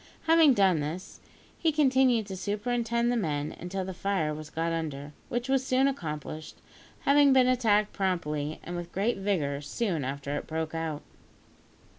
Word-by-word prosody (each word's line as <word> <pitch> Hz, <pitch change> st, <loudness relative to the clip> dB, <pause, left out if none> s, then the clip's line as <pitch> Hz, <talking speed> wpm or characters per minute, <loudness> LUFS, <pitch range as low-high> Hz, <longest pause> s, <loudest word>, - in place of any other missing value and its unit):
Having 320 Hz, -4 st, +6 dB
done 190 Hz, -6 st, +4 dB
this, 155 Hz, +5 st, -5 dB, 0.4 s
he 325 Hz, -, +2 dB
continued 260 Hz, -6 st, +3 dB
to 195 Hz, -1 st, -6 dB
superintend 235 Hz, +4 st, -1 dB
the -, -, +1 dB
men 150 Hz, -9 st, -2 dB
until 185 Hz, +2 st, -4 dB
the 190 Hz, -, -5 dB
fire 180 Hz, -5 st, -1 dB
was 155 Hz, 0 st, -8 dB
got 165 Hz, +1 st, -2 dB
under, 150 Hz, -3 st, -4 dB, 0.2 s
which 240 Hz, +1 st, -2 dB
was 265 Hz, -1 st, +2 dB
soon 260 Hz, +1 st, +3 dB
accomplished, 155 Hz, -, -5 dB, 0.5 s
having 280 Hz, -1 st, +5 dB
been 255 Hz, -1 st, +5 dB
attacked 215 Hz, -5 st, +2 dB
promptly 155 Hz, -6 st, -2 dB
and 175 Hz, -, -6 dB
with 175 Hz, 0 st, -6 dB
great 205 Hz, +5 st, 0 dB
vigour 155 Hz, -8 st, -1 dB
soon 170 Hz, -, -2 dB
after 140 Hz, +2 st, -3 dB
it -, -, -4 dB
broke 160 Hz, 0 st, -3 dB
out. 160 Hz, -2 st, -3 dB
190 Hz, 160 wpm, -28 LUFS, 155-245 Hz, 0.5 s, Having